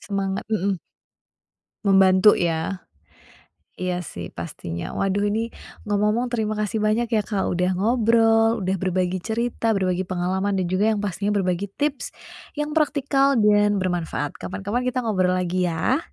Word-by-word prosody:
Semangat. 195 -1 -3
Mhm. 200 -3 0 1.1
Membantu, 190 +1 +6
ya? 170 +2 -1 1.0
Iya, 180 -1 -2
sih, 90 - -7
pastinya. 85 0 -6
Waduh, 200 +1 0
ini 225 +2 -2 0.3
ngomong-ngomong 210 +4 +1
terima 215 -2 -1
kasih 215 +1 -1
banyak 220 +2 +1
ya, 220 - +3
Kak, 200 -1 -2
udah 180 +1 0
ngobrol, 225 +1 +3
udah 190 +1 0
berbagi 185 0 0
cerita, 230 +1 -1
berbagi 185 -1 0
pengalaman, 190 +2 -1
dan 185 - +1
juga 185 +5 +1
yang 205 - -3
pastinya 200 +1 -2
berbagi 185 0 0
tips 290 -2 -1 0.5
yang 295 0 -2
praktikal 280 -3 +2
dan 210 -1 +4
bermanfaat. 175 -6 -2
Kapan-kapan 200 +5 -3
kita 255 0 -1
ngobrol 185 -4 +1
lagi, 180 0 0
ya! 170 - +1
200 Hz, 140 wpm, -23 LUFS, 185-225 Hz, 1.1 s, Membantu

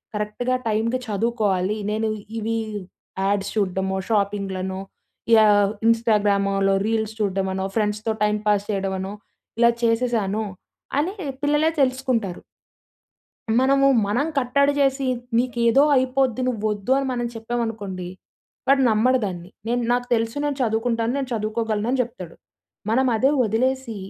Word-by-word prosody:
కరెక్ట్‌గా 210 +5 -1
టైమ్‌కి 230 +4 0
చదువుకోవాలి. 210 -2 0
నేను 220 +1 0 0.3
ఇవి 225 +1 -1 0.7
యాడ్స్ 200 0 0
చూడమో 190 -1 0
,షాపింగ్‌లనో 195 -3 -1 0.6
యాహ్, 205 -2 +5 0.2
ఇంస్టాగ్రామలో 200 -4 +2
రీల్స్ 220 -1 -1
చూడడమనో 190 -2 -1
ఫ్రెండ్స్‌తో 210 +1 0
టైం 210 0 +2
పాస్ 205 -1 +2
చేయడమనో 195 0 -2 0.5
ఇలా 235 - +6
చేసేసాను, 230 -3 +1 0.6
అని 355 +6 -1 0.3
పిల్లలే 295 +2 +3
తెలుసుకుంటారు. 255 -8 0 1.2
మనము 275 +1 +4 0.2
మనం 250 +9 0
కట్టడి 280 +2 +2
చేసి, 270 -1 +2 0.3
నీకేదో 240 +1 +3
అయిపోద్ది 260 -1 +1
నువోద్దు 215 -1 -2
అని 275 - 0
మనం 240 -1 -2
చెప్పామనుకోండి. 225 -5 -4 0.6
వాడు 270 0 +5
నమ్మడు 245 +4 +3
దాన్ని. 180 -2 -6 0.2
నేను 240 +1 0
నాకు 245 0 +1
తెలుసు 225 +1 0
నేను 290 -1 -1
చదువుకుంటాను. 230 0 0
నేను 265 -2 -3
చదువుకోగలను. 215 0 -1
అని 265 - 0
జెప్తాడు. 190 -9 -7 0.6
మనం 260 +2 +3
అదే 265 +6 +3
వదిలేసి 235 +2 0
225 Hz, 115 wpm, -23 LUFS, 205-250 Hz, 1.2 s, ఇలా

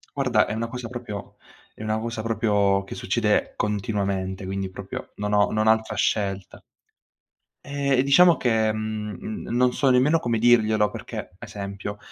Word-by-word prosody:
Guarda 125 -6 +2
è - - -3
una 115 +1 -2
cosa 125 0 -6
proprio 120 -5 -7 0.4
è - - -10
una 110 0 -1
cosa 115 -1 -4
proprio 105 -3 +1
che - - -8
succede - - 0
continuamente, 100 -2 -2
quindi 95 0 -3
proprio - - -7
non 105 0 -2
ho 105 -1 +3
non 110 0 +1
ho - - +8
altra 110 0 -1
scelta. 100 -3 -1 1.0
Eh, 140 -2 +1
diciamo 165 +4 +6
che, 110 -3 +2
mhmm, 110 - -5
non 125 +1 +2
so 135 - +2
nemmeno 130 +6 +4
come 120 -5 -1
dirglielo 110 -3 +4
perché, 110 -2 -7
esempio, 100 -2 -6
110 Hz, 155 wpm, -24 LUFS, 105-120 Hz, 1.0 s, ho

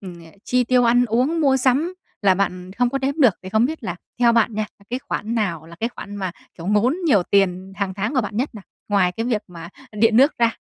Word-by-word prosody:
ừm, 180 -3 -9 0.3
chi 250 0 +1
tiêu 250 0 +3
ăn 245 +1 +4
uống, 255 +8 +1
mua 270 -3 +4
sắm 270 +8 +1 0.3
là 195 -2 +5
bạn 185 -1 -2
không 245 +3 +1
có 275 - -1
đếm 270 +1 -1
được, 235 -9 +6
thì 185 - -7
không 220 +4 +2
biết 315 0 -6
là 175 -2 -3 0.2
theo 235 -1 +5
bạn 230 -1 +2
nha, 215 0 -1
là 200 - -22
cái 250 - -1
khoản 230 -3 -4
nào 170 -8 -2
là 170 0 -13
cái 230 - 0
khoản 205 -4 -9
mà, 190 -3 -3 0.3
kiểu, 165 - -7
ngốn 210 +7 +2
nhiều 210 - +4
tiền 190 0 +1
hàng 195 -2 -2
tháng 210 +8 -2
của 255 - +3
bạn 210 -1 -5
nhất 255 +2 -2
nào, 205 -3 -10 0.2
ngoài 195 -3 +2
cái 225 +3 -3
việc 225 -4 0
mà 170 -1 -9 0.2
điện 220 +1 +3
nước 275 +5 +4
ra? 230 -1 +2
220 Hz, 250 wpm, -21 LUFS, 195-250 Hz, 0.3 s, được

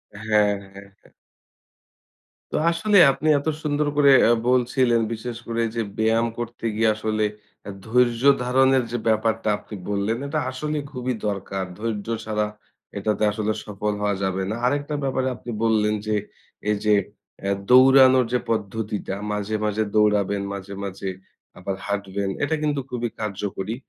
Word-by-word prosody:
হ্যাঁ, 105 -1 +2 0.2
হ্যাঁ, 100 0 -12
হ্যাঁ। - - -23 1.4
তো - - -3 0.2
আসলে 200 +5 +2
আপনি 155 +3 -3
এত 145 - -7 0.2
সুন্দর 150 0 0
করে 140 -1 +6 0.2
আ - - +6 0.2
বলছিলেন 125 -1 +2
বিশেষ 115 +1 -6
করে 115 0 -1
যে 115 - 0 0.2
ব্যায়াম 115 +1 +2
করতে 120 0 -6
গিয়ে 110 0 +3
আসলে 110 0 -1 0.4
আ - - -5 0.2
ধৈর্য 120 +1 +2 0.2
ধারণের 130 +1 +3
যে 120 - -1
ব্যাপারটা 110 0 +1
আপনি 105 - -10
বললেন 100 +3 0
এটা 155 +1 -1
আসলে 150 +4 -3
খুবই 125 -1 -2
দরকার। 95 -1 -3 0.2
ধৈর্য 110 -2 -3 0.2
ছাড়া 105 -1 0 0.5
এটাতে 105 +1 -1
আসলে 110 0 -1
সফল 105 0 -3
হওয়া 100 -1 +1
যাবে 95 0 -1
না। - - -2
আরেকটা 145 +3 0
ব্যাপারে 130 -1 0
আপনি 120 - -8
বললেন 105 -1 +2
যে 105 - +1 0.5
এই 105 - +3
যে 105 - +5 0.5
আ - - +1 0.2
দৌড়ানোর 130 0 +7
যে 125 - +3
পদ্ধতিটা 105 -2 -3 0.2
মাঝে, 105 +1 -2
মাঝে 105 +1 0
দৌড়াবেন, 105 -2 +2
মাঝে, 100 0 -7
মাঝে 95 0 -4 0.5
আবার 95 +1 -4
হাঁটবেন। 100 -1 -2
এটা 160 +2 +1
কিন্তু 145 -2 0
খুবই 120 -1 -2
কার্যকরী। 100 0 -3
110 Hz, 150 wpm, -23 LUFS, 105-125 Hz, 1.4 s, দৌড়ানোর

